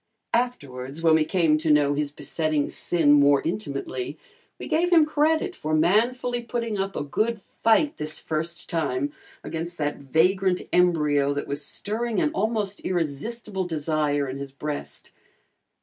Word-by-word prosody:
Afterwards, 145 - -2
when 165 -1 +5
we 160 -1 +4
came 160 -3 +2
to 160 0 -1
know 145 -1 +4
his 145 0 -1
besetting 155 -1 -1
sin 165 -4 +1
more 145 -1 +6
intimately, 145 -6 -4 0.4
we - - -7
gave 335 +2 +2
him 325 -3 +6
credit 315 +4 +1
for 155 0 -1
manfully 240 +9 +2
putting 230 -2 -3
up 195 0 -2
a - - -2
good 215 +10 -1
fight 230 +9 +1
this 155 0 -2
first 165 +2 -4
time 145 -3 -1 0.3
against 170 +1 -5
that 150 -1 -1
vagrant 180 +7 +2
embryo 150 -5 +3
that 145 - -2
was 145 +1 -1
stirring 220 +8 -2
an 300 - +1
almost 215 -8 -1
irresistible 185 +5 -2
desire 150 -3 0
in 130 +1 -5
his 140 -1 -6
breast. 145 +2 -6
165 Hz, 150 wpm, -25 LUFS, 145-215 Hz, 0.4 s, more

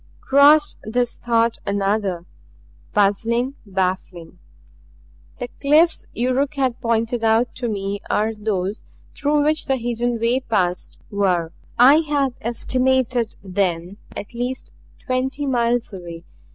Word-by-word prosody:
Crossed 290 +2 +5
this 240 +2 -1
thought 230 -1 +1
another 200 -3 -1 0.7
puzzling, 230 +6 +1
baffling. 185 -2 -3 1.0
The 245 - -4
cliffs 315 +4 +3
Yuruk 255 +4 0
had 260 -3 -1
pointed 230 0 0
out 225 +2 +2
to 245 -2 -2
me 200 -1 -3
as 220 +1 +1
those 205 -1 -2 0.3
through 290 +1 +1
which 310 +1 +1
the 270 - +2
hidden 240 -1 -2
way 235 +3 +2
passed 185 -8 -1
were, 180 -5 +1 0.3
I 265 +5 +8
had 290 -5 0
estimated 250 0 0
then, 185 -1 -2 0.2
at 205 - -7
least 245 +2 -4 0.3
twenty 265 +3 -1
miles 240 -3 0
away. 170 -3 -8
235 Hz, 115 wpm, -21 LUFS, 200-260 Hz, 1.0 s, I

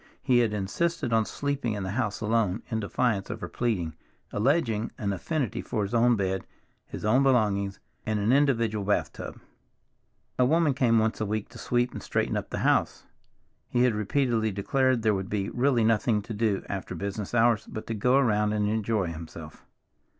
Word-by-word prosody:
He 125 -2 +4
had 115 -3 +2
insisted 115 - -1
on 110 -1 +3
sleeping 140 -5 -2
in 100 -2 -3
the 95 - -3
house 105 -2 -2
alone, 110 -2 0
in 110 - 0
defiance 105 -1 0
of - - -5
her 85 - -5
pleading, 90 -6 -1 0.4
alleging 115 -2 +1
an 100 -6 -1
affinity 135 - -2
for 105 - -2
his 100 +3 -4
own 120 +1 +4
bed, 95 -2 -1 0.4
his - - -7
own 120 +5 +4
belongings, 105 -7 +2 0.2
and 110 -1 -1
an 105 +5 +2
individual 115 -7 +2
bath 100 +1 0
tub. - - -8 1.0
A 125 - +5
woman 160 0 +3
came 125 -4 +3
once 110 0 +1
a - - +1
week 105 0 -2
to 115 0 -12
sweep 120 +1 0
and - - -7
straighten - - -1
up - - -3
the - - -4
house. - - +1 0.6
He 120 - +2
had 125 -2 +3
repeatedly 110 +1 +1
declared 130 +5 +1
there 110 -1 +3
would 95 -1 -3
be 100 -2 -2
really 125 -2 +2
nothing 110 -1 +2
to 115 - -6
do 105 -2 0
after 100 -1 -5
business 100 +2 -4
hours 115 -2 +3
but 110 - -6
to 115 - -3
go 125 +4 +2
around 105 -5 +2
and 105 -1 +1
enjoy 105 -4 0
himself. 80 -1 -10
110 Hz, 185 wpm, -27 LUFS, 100-120 Hz, 1.0 s, A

